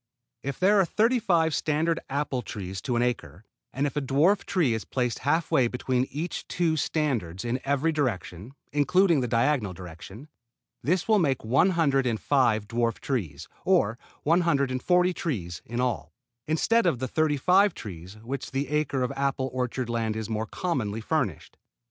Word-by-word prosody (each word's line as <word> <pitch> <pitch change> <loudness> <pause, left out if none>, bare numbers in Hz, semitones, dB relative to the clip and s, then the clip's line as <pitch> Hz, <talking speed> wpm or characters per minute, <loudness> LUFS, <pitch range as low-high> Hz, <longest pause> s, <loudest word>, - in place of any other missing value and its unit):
If 140 +2 -4
there 200 +3 +5
are 190 - +4
thirty 230 +7 +2
five 170 -7 +2
standard 160 +3 0
apple 140 -2 -1
trees 95 -4 -6
to 125 - -2
an 120 - +2
acre, 95 - -3 0.3
and 135 +2 -1
if 145 - -3
a 145 - 0
dwarf 150 +9 +2
tree 160 -11 +1
is 110 - -3
placed 125 -3 -2
half 160 +4 0
way 125 - +4
between 125 +1 -1
each 160 +5 -4
two 170 -2 +1
standards 125 - -1
in 120 +2 -1
every 140 +4 +1
direction, 120 - -3 0.2
including 165 +3 +3
the 125 - -1
diagonal 115 -3 +1
direction, 90 - -10 0.5
this 170 +7 0
will 215 -2 +4
make 135 -9 0
one 130 - +4
hundred 135 -5 +2
and 115 -3 -1
five 115 -7 +2
dwarf 115 -1 0
trees, 85 - -3 0.2
or 145 - +2 0.2
one 165 +4 +3
hundred 140 -6 +1
and 130 0 -2
forty 180 +2 +3
trees 90 - -4
in 120 +1 -4
all, 95 - -2 0.3
instead 185 +8 +2
of 165 - +2
the 130 +2 -3
thirty 155 +2 +1
five 185 +6 +4
trees 95 -1 -9
with 110 - -16
which 135 +3 -4
the 135 0 -2
acre 150 -3 0
of 125 - -1
apple 135 -1 -1
orchard 125 -1 -2
land 115 -2 -1
is 110 -1 -4
more 110 0 -2
commonly 115 - -2
furnished. 110 - -2
135 Hz, 180 wpm, -27 LUFS, 115-160 Hz, 0.5 s, there